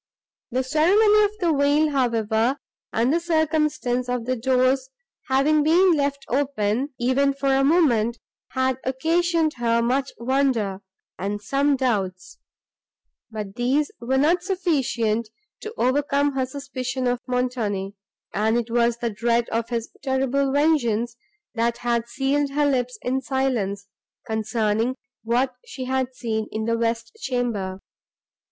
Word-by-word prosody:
The 255 +2 0
ceremony 405 +10 +4
of 410 - -1
the 340 -3 +2
veil, 290 +2 +3
however, 235 -1 +1 0.3
and 235 +5 +1
the 335 - +3
circumstance 305 -7 0
of 245 -2 -2
the 255 +1 0
doors 255 - +1 0.4
having 280 +3 +3
been 345 +4 +5
left 280 -2 -1
open, 260 -2 0
even 270 +3 +2
for 275 -1 +1
a 270 0 +3
moment, 255 -8 +3 0.4
had 260 0 0
occasioned 325 +4 +1
her 235 -1 +2
much 260 +3 0
wonder 235 -6 0 0.4
and 205 +2 -2
some 275 +7 +1
doubts; 195 -8 -2 0.9
but 210 -3 -6
these 260 +6 0
were 260 +3 0
not 325 +6 +3
sufficient 265 - 0 0.3
to 435 - -7
overcome 285 +2 +1
her 260 -1 -1
suspicion 260 -1 -4
of 245 0 0
Montoni; 235 -6 -1 0.4
and 220 +5 +1
it 235 -1 -3
was 235 0 +2
the 235 -1 -2
dread 235 +2 +1
of 230 0 -2
his 235 -2 -3
terrible 270 0 0
vengeance, 240 -6 +1 0.4
that 235 0 0
had 235 -1 -1
sealed 280 +3 0
her 295 +1 +2
lips 250 -3 0
in 260 +2 0
silence, 240 -8 -1 0.4
concerning 220 +2 0 0.3
what 245 +3 +1
she 260 -1 -7
had 260 0 -1
seen 220 -3 -2
in 220 0 -3
the 230 0 +1
west 230 0 -1
chamber. 220 -7 -2
255 Hz, 135 wpm, -23 LUFS, 230-280 Hz, 0.9 s, been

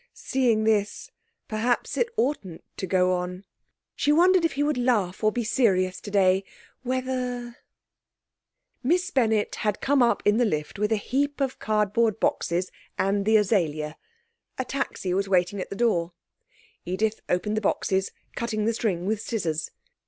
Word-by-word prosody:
Seeing 240 -5 +1
this, 210 -2 0 0.4
perhaps 230 +3 0
it 470 - +1
oughtn't 215 - -1
to 190 - -3
go 185 0 +3
on. 180 +1 -4 0.5
She 290 - +2
wondered 360 +3 +5
if 330 - +1
he 285 - 0
would 295 -3 0
laugh 220 -7 +1
or 215 - +4
be 240 +2 -2
serious 190 -6 +1
today... 195 -2 +2 0.4
whether... 250 -1 -3 1.2
Miss 350 +7 +1
Bennett 220 -5 +2
had 210 -2 -1
come 280 -1 +2
up 235 -4 +3
in 210 +1 +4
the 245 - +3
lift 155 -4 -2
with 210 +1 0
a - - +4
heap 280 +7 -1
of 270 -2 -1
cardboard 215 +1 +1
boxes, 175 +2 0 0.3
and 200 +1 +1
the 220 0 +6
azalea. 160 -8 0 0.6
A 260 - -2
taxi 250 -8 -3
was 195 +1 0
waiting 185 +1 +2
at - - -6
the - - -5
door. 180 -7 +1 0.7
Edith 215 +4 -1
opened 195 +4 0
the 215 - 0
boxes, 190 -1 0 0.3
cutting 220 -3 -2
the 230 - +2
string 190 -6 -1
with 210 +1 -1
scissors. 175 -9 -2
215 Hz, 155 wpm, -26 LUFS, 190-245 Hz, 1.2 s, the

